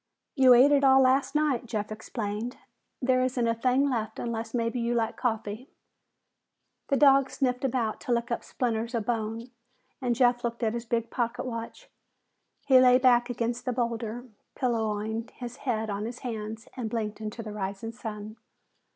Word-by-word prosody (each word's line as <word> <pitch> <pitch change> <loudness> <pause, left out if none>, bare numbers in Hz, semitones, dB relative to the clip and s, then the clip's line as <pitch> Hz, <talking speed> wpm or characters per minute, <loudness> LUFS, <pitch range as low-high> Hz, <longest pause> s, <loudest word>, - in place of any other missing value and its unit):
"You 260 -3 +7
ate 265 +4 +7
it 285 -1 +4
all 265 0 +7
last 265 +2 +3
night," 285 -6 +1
Jeff 215 -2 -3
explained. 215 +2 -4 0.5
"There 255 0 +3
isn't 250 -2 0
a 230 - +2
thing 255 +4 +2
left 230 -5 -2
unless 225 -1 -4
maybe 230 +1 -1
you 235 0 0
like 225 -1 0
coffee." 225 +1 -3 1.2
The 275 - +2
dog 275 -1 +5
sniffed 250 -2 -1
about 240 -4 -1
to - - -4
lick 235 +1 0
up 235 - -2
splinters 235 -1 -2
of 225 -3 -1
bone 230 +1 -3 0.5
and 245 -2 +1
Jeff 245 0 +3
looked 235 0 -3
at 220 -1 +1
his 235 0 -4
big 230 0 -1
pocket 240 +1 -2
watch. 230 - -6 0.8
He 260 -2 +7
lay 250 0 +7
back 245 -1 +4
against 240 0 -2
the 250 - 0
boulder, 235 0 -3 0.3
pillowing 220 -2 -1
his 245 0 -7
head 220 -2 -1
on 200 +1 -3
his 235 +2 -7
hands 220 -2 -5
and 240 -4 -3
blinking 215 -1 -3
into 215 +2 -5
the 215 -1 -7
rising 200 +2 -4
sun. 215 -2 -7
235 Hz, 170 wpm, -28 LUFS, 220-250 Hz, 1.2 s, You